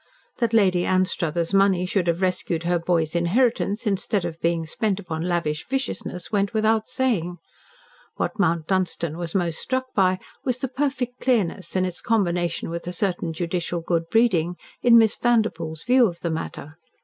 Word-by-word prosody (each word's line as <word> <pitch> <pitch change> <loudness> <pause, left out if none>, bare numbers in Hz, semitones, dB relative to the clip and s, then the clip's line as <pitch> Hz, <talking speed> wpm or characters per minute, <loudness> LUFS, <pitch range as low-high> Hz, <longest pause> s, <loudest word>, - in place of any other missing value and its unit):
That 235 -3 +1
Lady 190 -6 +3
Anstruthers' 175 -2 0
money 195 -2 +4
should 180 -1 0
have 170 +2 0
rescued 180 -2 -1
her 175 0 +1
boy's 165 -2 0
inheritance 210 +4 +1
instead 200 -2 0
of 165 -1 -6
being 165 -1 0
spent 200 +5 -1
upon 165 -5 -5
lavish 170 -3 -1
viciousness 265 -8 -3
went 200 +1 0
without 220 0 +2
saying. 230 -10 -1 0.8
What - - -3
Mount 170 -4 +2
Dunstan 175 -4 -1
was 170 0 -5
most 170 -4 0
struck 260 0 -2
by 185 -2 +3 0.3
was 250 -2 0
the 265 - -2
perfect 260 -2 -2
clearness, 195 -8 0
and 185 0 +2
its 180 -2 -5
combination 175 -7 0
with 170 +1 -5
a - - -2
certain 180 -2 -1
judicial 170 +1 -2
good 165 0 -1
breeding, 180 -6 +2 0.3
in 235 -1 +7
Miss 220 -2 +5
Vanderpoel's 215 -10 0
view 250 0 +5
of 170 -2 -7
the 170 - -1
matter. 160 -1 -6
180 Hz, 165 wpm, -24 LUFS, 170-220 Hz, 0.8 s, in